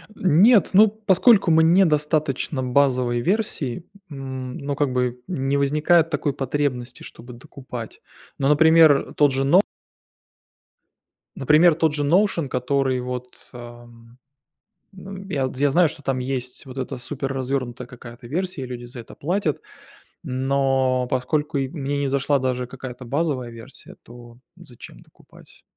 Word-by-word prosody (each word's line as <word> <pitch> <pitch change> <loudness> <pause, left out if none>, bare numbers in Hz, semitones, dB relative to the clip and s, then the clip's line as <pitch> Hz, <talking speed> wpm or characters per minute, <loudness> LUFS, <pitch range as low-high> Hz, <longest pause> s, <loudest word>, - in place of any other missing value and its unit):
Нет, 190 +6 +4
ну, 210 +3 +7
поскольку 210 -2 +3
мне 160 +4 +5
недостаточно 150 -4 0
базовой 125 -2 +1
версии, 180 - -2 0.2
м, 130 -3 -7
ну, 140 0 -4
как 145 -1 0
бы 125 -1 -1
не 140 -5 -1
возникает 155 +4 +2
такой 150 -2 -1
потребности, 130 -2 -3
чтобы 120 +2 -12
докупать. 125 -2 -10 0.4
Ну, 135 - 0
например, 160 0 +5
э, - - -12
тот 145 -2 +4
же 135 +1 -1
Но 175 +8 +5 1.7
например, 155 +4 +4
тот 160 -2 +1
же 145 -1 -2
Notion, 175 -2 +2
который, 130 0 0
вот, 125 0 -7 0.2
ам, 120 -1 -13 0.8
ну, 195 +1 -10
я 140 -8 -1
вот, 130 - -7
я 145 +1 +2
знаю, 170 +4 +4
что 155 -1 -9
там 135 -1 -1
есть 125 0 -5
вот 130 0 -9
эта 130 -1 -5
суперразвернутая 130 -2 -4
какая-то 120 0 -12
версия 175 +2 -3
и 130 - -5
люди 125 -1 -7
за 120 0 -10
это 115 - -13
платят. 170 -1 -2 0.6
Но 130 -1 0
поскольку 150 +4 -1
и 135 -1 -2
мне 145 -2 -4
не 140 - -1
зашла 140 +1 +1
даже 125 -1 -2
какая-то 125 -1 -9
базовая 140 -2 -2
версия, 115 -1 -13
то 120 0 -14 0.2
зачем 130 -10 -14
докупать? - - -21
135 Hz, 140 wpm, -22 LUFS, 125-155 Hz, 1.7 s, ну